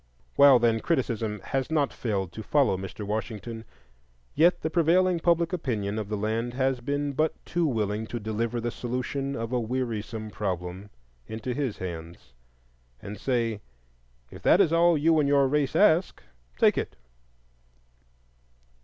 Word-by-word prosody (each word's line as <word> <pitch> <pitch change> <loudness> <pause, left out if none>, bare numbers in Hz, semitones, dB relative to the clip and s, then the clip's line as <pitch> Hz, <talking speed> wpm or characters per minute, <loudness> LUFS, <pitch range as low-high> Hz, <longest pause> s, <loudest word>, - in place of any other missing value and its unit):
While, 140 -2 +8
then, 115 -1 +2
criticism 115 - -1
has 135 +1 -2
not 150 -3 +1
failed 100 -6 -2
to 110 - -7
follow 140 -2 +2
Mr. 95 +2 -6
Washington, 110 +2 -4 0.7
yet 170 +4 +4
the 160 - -2
prevailing 175 +2 +3
public 170 +1 +2
opinion 110 - -2
of 105 -2 -5
the 105 - -2
land 115 +3 -2
has 130 -1 0
been 145 +2 -2
but 155 +3 0
too 170 -1 0
willing 110 -3 -1
to 120 - -4
deliver 110 +2 -2
the 120 +1 -2
solution 130 +3 -3
of 115 +1 -4
a 125 - +1
wearisome 115 -2 -3
problem 95 -1 -4 0.4
into 110 +3 -4
his 130 -4 -2
hands, 85 -6 -8 0.7
and 105 +1 -8
say, 115 -5 -1 0.7
"If - - -11
that - - +5
is 160 - +4
all 170 0 +4
you 160 +2 +3
and 140 -2 +2
your 140 -1 +4
race 145 0 0
ask, 185 -3 +3 0.3
take - - +4
it." - - -5
120 Hz, 150 wpm, -27 LUFS, 105-145 Hz, 0.7 s, While